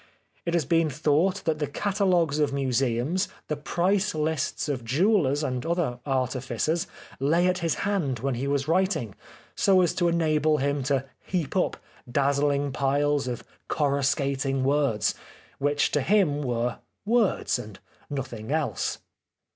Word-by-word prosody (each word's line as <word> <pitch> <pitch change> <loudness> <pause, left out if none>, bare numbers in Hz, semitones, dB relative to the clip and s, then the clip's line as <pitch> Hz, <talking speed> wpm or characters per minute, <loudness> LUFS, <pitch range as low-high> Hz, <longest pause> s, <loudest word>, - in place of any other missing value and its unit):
It 170 - +1
has 165 -5 +1
been 165 +2 +2
thought 155 +7 +1
that 155 -2 0
the 150 - -1
catalogues 180 -3 +1
of 145 -2 +2
Museums, 135 - 0 0.2
the 150 - 0
price 185 +6 0
lists 155 -2 -1
of 135 -5 -2
jewellers 145 - +2
and 125 -3 -2
other 165 -8 -1
artificers 130 +4 -1 0.3
lay 160 +6 +3
at 185 0 +2
his 165 -3 0
hand 175 -11 0
when 135 +3 -1
he 125 +3 -2
was 140 -1 0
WTiting, 165 - +1 0.4
so 195 -2 +4
as 175 - +2
to 175 - +1
enable 155 -2 +2
him 140 0 0
to 135 -1 +1 0.2
heap 175 -7 -2
up - - +1 0.3
dazzling 140 +1 +1
piles 140 +1 +1
of 120 -2 -4 0.2
coruscating 140 -2 0
words, 135 -7 +2 0.5
which 145 +1 +1
to 145 - +1
him 165 -3 +2
were 120 -2 -1 0.3
words 220 - +2
and 105 -4 -9 0.3
nothing 130 -4 -5
else. 145 - -1
145 Hz, 140 wpm, -26 LUFS, 135-170 Hz, 0.5 s, so